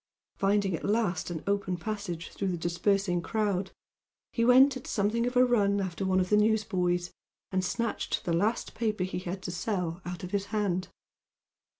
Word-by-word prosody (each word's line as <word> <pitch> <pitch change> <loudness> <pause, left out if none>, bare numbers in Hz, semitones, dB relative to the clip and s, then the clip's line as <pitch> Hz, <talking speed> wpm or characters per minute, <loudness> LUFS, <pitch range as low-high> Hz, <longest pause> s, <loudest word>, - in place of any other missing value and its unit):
Finding 195 -2 +2
at - - -7
last 205 -6 0
an 165 -3 -5
open 200 -2 0
passage 190 -4 -4
through 195 - -3
the 180 -2 -1
dispersing 175 +2 +1
crowd, 200 -1 -1 0.6
he 230 - +1
went 260 +3 +7
at 260 - -8
something 225 +3 +1
of 245 - -3
a 250 - +7
run 205 -5 +2
after 190 -1 -3
one 185 0 +3
of 185 0 0
the 210 - +6
newsboys, 185 -5 +1 0.4
and 185 -1 +1
snatched 230 +5 -2
the 170 - 0
last 205 +7 0
paper 215 -4 -1
he 180 -1 -3
had 185 +1 -5
to 180 - -4
sell 180 -2 -2
out 180 -1 -6
of 180 - -6
his 200 -1 0
hand. 195 -4 -1
195 Hz, 180 wpm, -29 LUFS, 180-215 Hz, 0.6 s, went